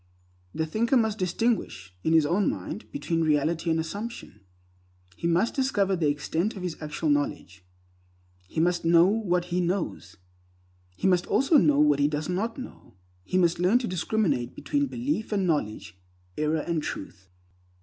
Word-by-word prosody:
The 160 - 0
thinker 230 - +1
must 220 -2 0
distinguish, 185 - -1
in 160 - +2
his 160 -2 +5
own 180 +6 +2
mind, 215 - -6
between 170 -12 -2
reality 160 +2 +1
and 160 0 +2
assumption. 200 - -6 0.8
He 170 - -3
must 175 +7 +2
discover 205 -8 +1
the 165 -4 0
extent 160 +8 -1
of 190 - -7
his 180 -3 -3
actual 150 0 -1
knowledge. 100 -10 -2 0.8
He 155 - -4
must 175 +1 +1
know 170 +1 +6
what 185 -4 +1
he 180 - +2
knows. 175 - -3 0.8
He - - -4
must 180 -2 +2
also 275 +4 +4
know 145 - +3
what 150 -1 +4
he 145 - +4
does 150 +2 -3
not 210 +6 -2
know. 255 - -10 0.3
He 185 - -1
must 170 -2 +2
learn 185 +7 +4
to 250 -2 -2
discriminate 180 - -1
between 285 -1 -1
belief 245 -3 -3
and 200 -3 +1
knowledge, 105 - -2 0.4
error 155 +1 0
and 170 -1 -2
Truth. 95 -7 -7
175 Hz, 160 wpm, -26 LUFS, 150-210 Hz, 0.8 s, know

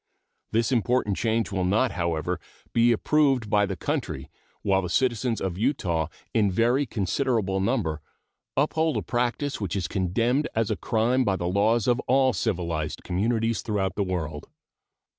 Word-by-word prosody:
This 115 +2 +1
important 120 -3 +1
change 115 0 0
will 95 -2 -1
not, 110 +7 +2
however, 85 0 -1 0.3
be 120 +1 +4
approved 135 -2 +2
by 105 -1 +3
the 95 - -3
country - - -3 0.3
while 95 -1 +2
the 90 - -4
citizens 120 +1 +1
of 95 -1 -3
Utah 90 - 0 0.3
in 105 -3 +3
very 120 +8 +2
considerable 105 -1 0
number 95 - 0 0.6
uphold 155 0 +1
a 105 - -2
practice 120 - -1
which 100 -1 -2
is 95 -4 -1
condemned 115 - 0
as 110 -1 +1
a - - +1
crime 120 +5 +1
by 100 -5 +1
the 85 - -3
laws 105 +4 +2
of 120 0 +3
all 130 0 +4
civilized 85 -7 -2
communities 115 +4 0
throughout 100 -4 -1
the 100 - 0
world. 80 -5 -4
110 Hz, 155 wpm, -26 LUFS, 95-120 Hz, 0.6 s, be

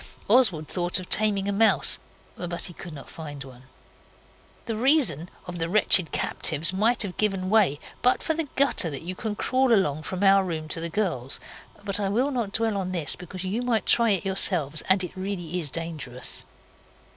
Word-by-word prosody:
Oswald 200 - +4
thought 175 0 0
of 185 - -10
taming 205 -2 +4
a - - 0
mouse, 200 -6 +3 0.4
but 175 -1 -4
he 175 - -4
could 175 - -10
not 145 -3 -10
find 145 -4 -8
one. 130 -2 -13 1.0
The 225 - -3
reason 220 - +3 0.2
of 175 -1 -7
the 165 0 -2
wretched 185 -4 +4
captives 165 +5 0
might 220 +5 +2
have 190 -3 -6
given 195 -3 0
way 200 -10 +3 0.2
but 250 - +3
for 320 - 0
the 320 -1 -2
gutter 265 -10 +3
that 140 0 -5
you 180 +2 -4
can 210 +2 -4
crawl 255 +3 +1
along 155 -9 +2
from 185 +4 -4
our 195 0 +5
room 160 -4 -4
to 165 - -4
the 170 - -3
girls'. 165 - -2 0.4
But 200 0 -2
I 200 -1 -1
will 250 +8 +1
not 235 -6 -2
dwell 220 -1 0
on 185 -1 -3
this 165 -5 -2
because 180 +1 -8
you 200 +6 -2
might 240 -3 0
try 235 -1 +4
it 195 -4 0
yourselves, 175 -6 +1
and 190 0 +4
it 180 - -7
really 185 -3 -4
is 155 -4 -3
dangerous. 155 -5 -5
185 Hz, 190 wpm, -25 LUFS, 165-215 Hz, 1.0 s, our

